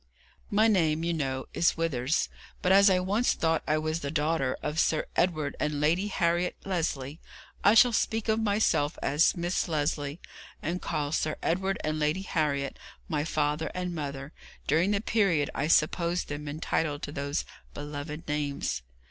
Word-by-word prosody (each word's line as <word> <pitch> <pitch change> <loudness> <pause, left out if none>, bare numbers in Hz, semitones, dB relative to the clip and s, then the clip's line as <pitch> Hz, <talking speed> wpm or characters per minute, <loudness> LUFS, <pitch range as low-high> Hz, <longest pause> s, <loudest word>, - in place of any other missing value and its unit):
My 215 +2 +4
name, 165 -7 +2
you 170 0 0
know, 135 -4 -2
is 170 - +2
Withers; 150 -3 0 0.4
but 180 - +3
as 200 +1 +7
I 185 - +4
once 205 +7 +1
thought 165 -1 +1
I 155 - +2
was 155 +1 -1
the 140 - -4
daughter 150 -3 0
of 150 +2 -1
Sir 155 - +2
Edward 155 -5 +1
and 150 -1 -1
Lady 170 +7 +2
Harriet 175 -2 +1
Lesley, 160 -6 -2 0.4
I 205 - +6
shall 235 +2 +7
speak 220 0 0
of 220 0 +2
myself 205 -8 +1
as 150 +7 +3
Miss 175 +1 -1
Lesley, 145 -1 -1 0.4
and 175 +3 -3
call 145 -1 -2
Sir 155 -1 0
Edward 190 +3 0
and 155 0 -1
Lady 155 +5 0
Harriet 145 -6 -1 0.3
my 150 -3 -1
father 150 0 0
and 180 -1 -3
mother 140 -2 -5 0.3
during 165 +6 +2
the 205 -1 +1
period 195 -11 +2
I 145 - -1
supposed 170 +2 +2
them 145 0 -5
entitled 150 0 -2
to - - -4
those 140 0 -2 0.3
beloved 145 +1 -6
names. 145 - -2
155 Hz, 165 wpm, -28 LUFS, 145-180 Hz, 0.4 s, as